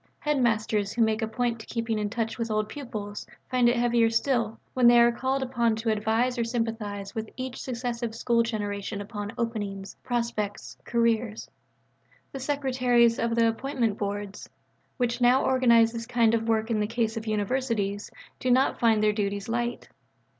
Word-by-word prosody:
Headmasters, 220 Hz, -7 st, 0 dB
who 235 Hz, -, +3 dB
make 220 Hz, 0 st, +1 dB
a 220 Hz, -, 0 dB
point 235 Hz, 0 st, -2 dB
of -, -, -14 dB
keeping 230 Hz, -2 st, -2 dB
in 210 Hz, -1 st, -1 dB
touch 225 Hz, +1 st, -3 dB
with 230 Hz, 0 st, -2 dB
old 215 Hz, 0 st, 0 dB
pupils, 215 Hz, -5 st, -6 dB, 0.2 s
find 250 Hz, -2 st, +4 dB
it 240 Hz, -, +2 dB
heavier 235 Hz, -1 st, +3 dB
still, 230 Hz, -1 st, 0 dB
when 250 Hz, -2 st, +4 dB
they 240 Hz, 0 st, +7 dB
are 235 Hz, 0 st, +6 dB
called 265 Hz, +3 st, -1 dB
upon 235 Hz, -3 st, +1 dB
to 225 Hz, +1 st, -1 dB
advise 225 Hz, +4 st, 0 dB
or -, -, +2 dB
sympathise 225 Hz, -4 st, -3 dB
with 220 Hz, -1 st, -4 dB
each 255 Hz, -1 st, -5 dB
successive 235 Hz, -2 st, -3 dB
school 230 Hz, 0 st, +2 dB
generation 205 Hz, -3 st, -3 dB
upon 205 Hz, 0 st, -5 dB
openings, 205 Hz, -4 st, -4 dB
prospects, 230 Hz, -4 st, -3 dB
careers. 230 Hz, -2 st, 0 dB, 0.8 s
The 270 Hz, -, -6 dB
secretaries 255 Hz, -4 st, +2 dB
of 230 Hz, 0 st, 0 dB
the 230 Hz, -1 st, +4 dB
Appointments 230 Hz, -2 st, -1 dB
Boards, 205 Hz, 0 st, -4 dB, 0.5 s
which 245 Hz, -1 st, -1 dB
now 250 Hz, +2 st, +4 dB
organize 235 Hz, -3 st, +4 dB
this 230 Hz, -1 st, -5 dB
kind 235 Hz, -2 st, +3 dB
of 225 Hz, 0 st, 0 dB
work 220 Hz, +1 st, +1 dB
in 220 Hz, -, +1 dB
the 210 Hz, -, 0 dB
case 225 Hz, -1 st, -1 dB
of 225 Hz, 0 st, -5 dB
Universities, 210 Hz, -2 st, -1 dB, 0.3 s
do 255 Hz, -, -1 dB
not 260 Hz, +2 st, +3 dB
find 220 Hz, -2 st, +3 dB
their 210 Hz, 0 st, +3 dB
duties 200 Hz, -1 st, -2 dB
light. 240 Hz, +1 st, -2 dB
230 Hz, 170 wpm, -27 LUFS, 215-240 Hz, 0.8 s, they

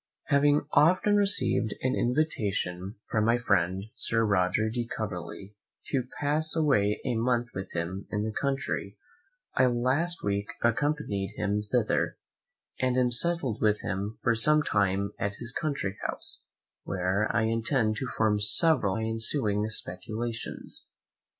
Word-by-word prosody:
Having 145 Hz, +1 st, +3 dB
often 185 Hz, +7 st, +4 dB
received 200 Hz, -, +3 dB
an 130 Hz, +1 st, +1 dB
invitation 105 Hz, -, -1 dB, 0.2 s
from 110 Hz, -2 st, +2 dB
my 115 Hz, +2 st, +3 dB
friend 95 Hz, -5 st, +1 dB
Sir 115 Hz, -3 st, +1 dB
Roger 100 Hz, +1 st, +2 dB
de 120 Hz, +1 st, -3 dB
Coverley 100 Hz, -2 st, -6 dB, 0.4 s
to 130 Hz, -2 st, -1 dB
pass 155 Hz, +2 st, 0 dB
away 135 Hz, -10 st, +2 dB
a -, -, 0 dB
month 120 Hz, +1 st, 0 dB
with 95 Hz, -1 st, -6 dB
him 90 Hz, +3 st, -4 dB
in 105 Hz, -1 st, -2 dB
the 110 Hz, -, -2 dB
country, 135 Hz, -7 st, -2 dB, 0.6 s
I 130 Hz, -, +4 dB
last 130 Hz, +8 st, 0 dB
week 100 Hz, 0 st, -1 dB, 0.2 s
accompanied 115 Hz, -5 st, 0 dB
him 105 Hz, 0 st, -1 dB
thither, 110 Hz, +1 st, 0 dB, 0.6 s
and 130 Hz, -1 st, +1 dB
am 125 Hz, -1 st, +2 dB
settled 135 Hz, -3 st, +1 dB
with 105 Hz, -1 st, +2 dB
him 100 Hz, +3 st, -4 dB
for 120 Hz, -, +3 dB
some 150 Hz, +7 st, +5 dB
time 100 Hz, -2 st, 0 dB
at 100 Hz, 0 st, -2 dB
his 120 Hz, +3 st, -6 dB
country 135 Hz, -, -3 dB
house, -, -, -5 dB, 0.4 s
where 95 Hz, +3 st, -1 dB
I -, -, +1 dB
intend 115 Hz, 0 st, 0 dB
to 130 Hz, -, -3 dB
form 105 Hz, -2 st, +2 dB
several 105 Hz, -, +4 dB
of 110 Hz, -, -2 dB
my -, -, -1 dB
ensuing 110 Hz, -2 st, +1 dB
Speculations. 110 Hz, +3 st, -2 dB
110 Hz, 140 wpm, -28 LUFS, 100-130 Hz, 0.6 s, some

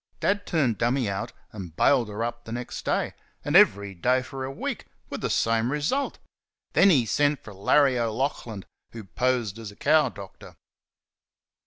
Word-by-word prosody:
Dad 205 Hz, 0 st, 0 dB
turned 135 Hz, -10 st, +1 dB
"Dummy" 120 Hz, +1 st, +1 dB
out 100 Hz, -1 st, -3 dB, 0.2 s
and 90 Hz, -6 st, -9 dB
bailed 120 Hz, -1 st, +3 dB
her 105 Hz, +2 st, -3 dB
up 120 Hz, 0 st, -5 dB
the 115 Hz, -, -9 dB
next 120 Hz, +1 st, -5 dB
day -, -, -1 dB, 0.3 s
and -, -, -1 dB
every 100 Hz, 0 st, +5 dB
day 125 Hz, +8 st, +1 dB
for 130 Hz, 0 st, -7 dB
a 130 Hz, -, -4 dB
week 135 Hz, -, -5 dB, 0.2 s
with -, -, -5 dB
the -, -, -1 dB
same 115 Hz, +2 st, +1 dB
result. 155 Hz, -, -1 dB, 0.6 s
Then 200 Hz, -, +6 dB
he 135 Hz, -10 st, +4 dB
sent 145 Hz, +5 st, +1 dB
for 105 Hz, -, -10 dB
Larry 130 Hz, +6 st, +3 dB
O'Laughlin, 115 Hz, -3 st, -2 dB, 0.3 s
who 115 Hz, -1 st, -8 dB
posed 115 Hz, 0 st, -1 dB
as 110 Hz, -3 st, -7 dB
a -, -, -16 dB
cow 155 Hz, +5 st, +3 dB
doctor. 100 Hz, -1 st, -12 dB
120 Hz, 170 wpm, -26 LUFS, 105-140 Hz, 0.6 s, Then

